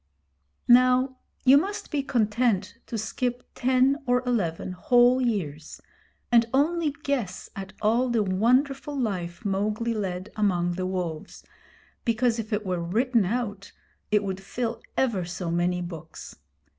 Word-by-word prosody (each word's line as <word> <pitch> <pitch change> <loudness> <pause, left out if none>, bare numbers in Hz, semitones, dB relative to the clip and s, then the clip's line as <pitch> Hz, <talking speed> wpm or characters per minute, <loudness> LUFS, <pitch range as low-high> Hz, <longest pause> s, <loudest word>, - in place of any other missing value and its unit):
Now 255 +1 +5 0.3
you 270 +2 +8
must 400 +6 -4
be 295 -3 +1
content 230 -4 0
to 230 - -4
skip 245 +3 -3
ten 260 +2 +3
or 250 +1 +2
eleven 185 -9 -1
whole 245 +7 +4
years, 165 - -3 0.5
and 230 -1 +5
only 320 +3 +2
guess 240 -10 -2
at 190 -1 -7
all 235 +4 +3
the 230 -3 +2
wonderful 260 +9 +1
life 180 -7 -3
Mowgli 210 +4 0
led 190 -2 -4
among 180 -5 +1
the 185 +1 -2
wolves, 175 -4 -4 0.6
because 235 0 +1
if 220 0 -5
it 210 0 -1
were 180 -2 -1
written 225 +5 +1
out 205 -2 -3 0.4
it 210 -1 +3
would 190 -1 -4
fill 230 +4 -4 0.2
ever 230 -9 +1
so 175 0 -4
many 175 +1 0
books. 165 -2 -9
220 Hz, 135 wpm, -26 LUFS, 185-250 Hz, 0.6 s, you